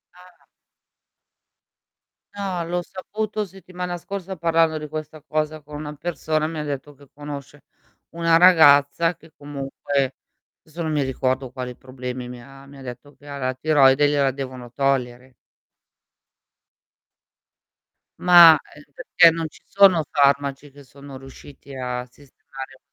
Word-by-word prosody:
Ah. 180 0 -19 2.0
No, 190 -4 -3
l'ho 175 +1 -2
saputo 210 +3 -4
settimana 180 -2 -7
scorsa 190 +1 -7
parlando 165 -1 +1
di 150 0 -6
questa 155 0 -7
cosa 155 0 -3
con 150 +1 -12
una 150 0 -6
persona. 155 0 -2
Mi 160 -1 -5
ha - - -3
detto 145 0 -6
che 140 -1 -20
conosce 145 -1 -9 0.5
una 165 0 +2
ragazza, 165 -1 +5
che 165 -1 -20
comunque 140 -1 -3 0.5
desso 160 +2 -10
non 160 - -2
mi 150 -2 0
ricordo 130 0 -2
quali 125 -1 -6
problemi 125 -1 -7
mi 125 -1 -9
ha 135 +1 -15
mi 140 0 -14
ha - - -12
detto 130 +3 -10
che 145 - -18
ha 140 0 -7
la 130 -1 -2
tiroide, 145 -1 +4
gliela 140 -2 +2
devono 130 -3 -8
togliere. 130 -2 -2 2.9
Ma 170 -3 +9 0.2
é 150 - -14
perché 170 +3 +5
non 165 -1 -3
ci - - -19
sono 195 -5 +5
farmaci 140 0 +1
che 145 +1 -16
sono 140 +1 -12
riusciti 135 +1 -13
a 125 -1 -4
sistemare 135 0 -13
145 Hz, 135 wpm, -22 LUFS, 135-165 Hz, 2.9 s, Ma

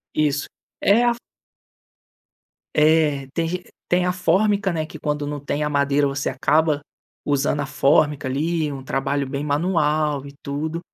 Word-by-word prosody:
Isso. 145 -1 +1 0.3
É 215 +4 +4
a 240 - +4 1.6
É. 150 -3 +3
Tem 165 -1 0
ge 180 +2 -3 0.3
tem 180 0 +3
a 180 - +1
fórmica, 195 +3 +2
né. 160 -2 -2
Que 155 - -10
quando 150 0 -2
não 145 0 -4
tem 145 +1 -2
a 150 - 0
madeira, 140 0 +2
você 140 +1 -2
acaba 150 +3 +2 0.4
usando 145 0 +1
a - - -2
fórmica 145 0 +2
ali. 155 +3 -1
Um 135 -1 -7
trabalho 135 +1 -1
bem 140 +1 -3
manual 150 -2 +1
e 140 - -10
tudo. 155 +4 -3
150 Hz, 155 wpm, -22 LUFS, 140-165 Hz, 1.6 s, É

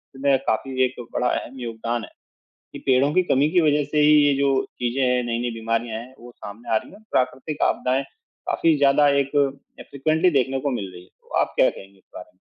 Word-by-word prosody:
इसमें 135 0 +2
काफ़ी 130 +3 0
एक 130 - -5 0.2
बड़ा 125 - 0
अहम 130 +1 -4
योगदान 115 0 -3
है - - -16 0.6
कि - - -7
पेड़ों 135 +2 +3
की 185 - +3
कमी 145 -2 +2
की 180 - +4
वजह 150 -1 +2
से 150 - +1
ही 150 +1 +6
ये 145 - +4
जो 140 0 +2 0.3
चीज़ें 125 +2 -1
हैं, 125 -1 +2
नई-नई 120 0 -2
बीमारियाँ 115 0 -2
हैं 130 +2 -13
वो 120 +1 -12
सामने 110 +1 -11
आ - - +5
रही - - -8
हैं। 205 +2 -15
प्राकृतिक 130 +4 -1
आपदाएँ 130 +2 0
काफ़ी 165 - -2
ज़्यादा 145 +1 +4
एक 140 +1 -6 0.5
अ, - - -9
फ्रीक्वेंटली 155 +5 +1
देखने 135 +1 -1
को 140 0 -2
मिल 100 -6 -4
रही 90 - -11
हैं। 90 - -23
तो - - -31
आप - - -2
क्या - - +5
कहेंगे 95 0 -13
इस - - -33
बारे - - -9
में? - - -38
130 Hz, 220 wpm, -23 LUFS, 120-145 Hz, 0.6 s, ही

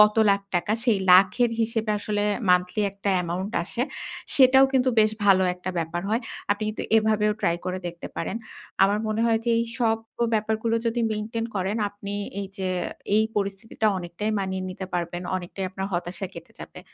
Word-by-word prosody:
কত 210 0 +7 0.2
লাখ 200 0 +2
টাকা, 205 +5 0
সেই 215 -4 +4 0.2
লাখের 195 +6 +5
হিসেবে 225 -1 0
আসলে 205 0 -1 0.3
মান্থলি 180 +3 +2
একটা 200 0 -2
এমাউন্ট 185 +5 -3
আসে। 235 +7 -2 0.5
সেটাও 265 0 +7
কিন্তু 260 -1 +3
বেশ 215 0 +4
ভালো 190 -2 +6
একটা 180 +1 -5
ব্যাপার 165 +1 -2
হয়। 225 +3 +1 0.3
আপনি 205 +1 +1
কিন্তু 215 - -4
এভাবেও 215 -1 +3
ট্রাই 170 - +2
করে 185 0 -2
দেখতে 170 0 -6
পারেন। 190 +6 -3 0.5
আমার 205 +2 +2
মনে 215 +1 -1
হয় 225 -1 +3
যে 235 - +1
এই 230 - +1
সব 225 -2 +2 0.2
ক - - -10
ব্যাপারগুলো 220 +1 0
যদি 230 +1 0
মেইনটেন 225 +2 -3
করেন 190 +3 -1
আপনি 205 0 -7 0.3
এইযে 195 -1 -5 0.5
এই 220 - +4
পরিস্থিতিটা 200 +2 -2
অনেকটাই 175 +5 -4
মানিয়ে 190 -1 -2
নিতে 185 0 -6
পারবেন, 175 0 -2
অনেকটাই 185 +2 -5
আপনার 190 0 -4
হতাশা 175 +2 -3
কেটে - - -11
যাবে। - - -9
205 Hz, 175 wpm, -25 LUFS, 185-220 Hz, 0.5 s, কত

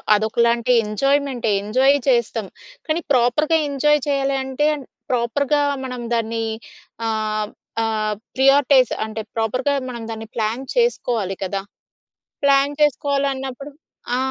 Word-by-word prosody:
అదొకలాంటి 235 +3 +1
ఎంజాయ్మెంటే 265 +2 0
enjoy 260 +7 +3
చేస్తాం. 235 -4 +1 0.4
కానీ 315 +2 0
ప్రాపర్‌గా 265 +6 +3
ఎంజాయ్ 295 +2 +3
చేయాలి 275 -1 +1
అంటే, 265 +3 0 0.4
ప్రాపర్‌గా 280 +5 +1 0.2
మనం 250 -2 -5
దాన్ని 230 0 -1 0.6
ఆహ్, 215 -1 -1 0.3
ఆహ్, 215 -1 -1 0.2
ప్రియారిటైజ్ 270 -1 +5
అంటే, 220 0 -5
ప్రాపర్‌గా 255 +6 0 0.2
మనం 235 -2 -6
దాన్ని 225 0 -6
ప్లాన్ 225 +3 -1
చేసుకోవాలి 240 - 0
కదా! 195 +1 -2 0.8
ప్లాన్ 275 0 +4
చేసుకోవాలన్నప్పుడు 275 -1 0 0.4
ఆ! - - +1
250 Hz, 105 wpm, -21 LUFS, 225-280 Hz, 0.8 s, ప్రియారిటైజ్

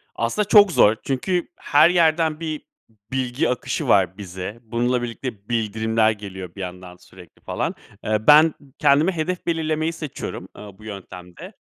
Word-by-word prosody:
Aslında 120 - -1
çok 205 -2 +7
zor. 110 -8 +5
Çünkü 175 +7 -1
her 150 +3 +4
yerden 160 -3 +2
bir 155 -2 -4 0.5
bilgi 130 +3 -1
akışı 125 - -2
var 95 - +3
bize. 95 +3 -7
Bununla 120 +2 0
birlikte 115 -3 -6
bildirimler 110 -1 +1
geliyor 95 -4 -8
bir 100 - -7
yandan 90 -1 -8
sürekli, 90 -1 -17
falan. - - -3 0.3
Eee, 110 0 -1
ben 155 +1 +7 0.3
kendime 150 +6 +4
hedef 175 +1 -3
belirlemeyi 160 -1 -1
seçiyorum, 155 -4 -7
eee, 105 - -10
bu 110 - -17
yöntemde. 90 -4 -10
120 Hz, 145 wpm, -22 LUFS, 105-155 Hz, 0.5 s, çok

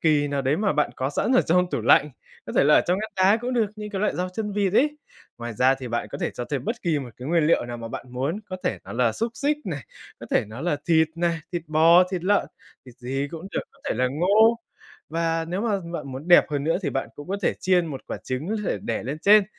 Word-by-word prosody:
kỳ 150 -2 +3
nào 140 -1 -1
đấy 135 +4 +1
mà 205 -1 +1
bạn 150 0 +1
có 130 +1 -1
sẵn 235 - 0
ở 255 - +6
trong 180 +2 +2
tủ - - -1
lạnh, 140 +6 +4 0.4
có - - -6
thể - - +5
là 150 - +6
ở - - +7
trong 180 +2 0
ngăn 220 +1 -4
đá 190 +3 +5
cũng 245 +2 -4
được, 230 -3 +2
những 210 0 -6
cái 195 - -3
loại 210 - 0
rau 180 +1 -1
chân 210 +3 -4
vịt 200 -2 0
ấy. 295 +7 +2 0.4
Ngoài 120 0 -5
ra 130 +4 +4
thì 130 -2 -7
bạn 120 0 -2
có - - -5
thể - - -1
cho 120 - -5
thêm 140 +1 -3
bất 235 +3 -3
kỳ 165 -5 +1
một 135 - -6
cái 125 +4 -7
nguyên 165 -2 +3
liệu 165 - +3
nào 120 0 -5
mà 115 -1 -7
bạn 125 - -7
muốn, 140 +11 -2
có 185 - -5
thể - - 0
nó - - -8
là 120 -2 +2
xúc 230 +1 -2
xích 290 +7 0
này, 165 -8 -4 0.4
có - - -8
thể - - +2
nó 110 +4 -9
là 165 -1 0
thịt 160 -1 +4
này, 170 -1 0
thịt 175 -2 -2
bò, 165 +3 +6
thịt 180 -2 -3
lợn, 205 +1 +2 0.4
thịt 125 - -13
gì 135 +3 -3
cũng 165 +2 -7
được, - - 0
có - - -26
thể - - 0
là 130 0 +1
ngô, 205 - +4 0.5
và 165 0 -1
nếu 180 +3 -2
mà 210 -3 0
bạn 145 -5 -5
muốn 140 +6 -7
đẹp 175 - +8
hơn 145 -1 -1
nữa 165 +2 +2
thì 145 - -1
bạn 135 - -2
cũng 145 +3 -10
có 195 - -1
thể - - +1
chiên 180 -2 +2
một 140 -4 -6
quả - - -4
trứng 130 +7 -3 0.2
để - - -1
để 115 - -2
lên 140 +6 -4
trên. 210 0 +7
165 Hz, 280 wpm, -24 LUFS, 135-195 Hz, 0.5 s, đẹp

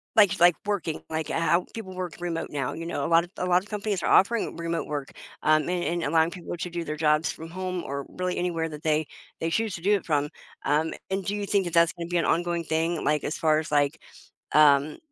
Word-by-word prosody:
Like 200 -4 +5
like, 175 -1 +7
working 195 -6 -2
like, 160 -1 -3
h - - -3
how 170 +2 +2
people 190 -5 -7
work 180 -2 -5
remote 170 -2 -3
now, 135 -3 -2
you 165 - -6
know, 145 -4 -2
a - - 0
lot 165 +1 +5
of 175 - -11
a - - -1
lot 180 0 +3
of 210 - -17
companies 205 -3 -2
are - - 0
offering 215 -1 +3
remote 170 0 -2
work, 145 -2 -4 0.3
um, 155 +1 +3
and 180 -1 0
and 170 +2 -1
allowing 160 +2 +2
people 175 -1 -6
to 180 +1 -4
do 170 0 -4
their 155 -1 -4
jobs 150 0 +2
from 160 +1 -9
home, 185 0 -3
or 140 0 -4
really 180 0 -3
anywhere 170 -2 -1
that 150 -2 -9
they 155 -1 +1 0.3
they 165 - -1
choose 220 +4 0
to 170 - -8
do 200 +4 +3
it 200 - -3
from. 145 -3 +1 0.4
Um, 150 +3 +1 0.2
and 190 0 -1
do 200 - -2
you 205 -1 -2
think 200 -1 +1
it 175 - -4
that's 170 -1 +4
gonna 170 -1 -6
be 175 - +1
an 170 - +1
ongoing 170 0 0
thing, 160 +1 -1
like, 150 -1 +1
as 150 - -2
far 155 -1 +3
as, 155 - -6
like, 145 +1 +1 0.5
um 150 0 +5
170 Hz, 250 wpm, -26 LUFS, 155-180 Hz, 0.5 s, like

